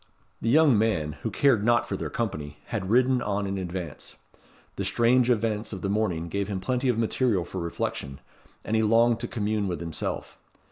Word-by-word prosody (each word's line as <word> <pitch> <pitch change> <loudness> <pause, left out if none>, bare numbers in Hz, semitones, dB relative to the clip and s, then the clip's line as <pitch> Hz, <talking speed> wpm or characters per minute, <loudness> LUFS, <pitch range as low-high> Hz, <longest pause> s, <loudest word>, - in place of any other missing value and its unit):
The 115 - 0
young 145 -4 +5
man, 85 -9 0
who 115 - -2
cared 115 0 +3
not 120 +1 +3
for - - -2
their - - -4
company, 75 -11 -4
had 95 - -3
ridden 125 +2 +3
on 100 -2 -1
in 95 0 -2
advance. 90 -4 -6 0.6
The - - -3
strange 120 +1 +3
events 110 -2 0
of 95 - -6
the 100 - -1
morning 90 -6 0
gave 100 +3 -2
him 100 -2 -3
plenty 125 +7 0
of 120 - +1
material 115 -4 +1
for 95 - -6
reflection, 70 -4 -4 0.4
and 110 - -1
he 110 - +3
longed 115 +2 +4
to - - -3
commune 105 -2 -1
with 90 -4 -3
himself. 80 -1 -5
105 Hz, 190 wpm, -26 LUFS, 95-120 Hz, 0.6 s, young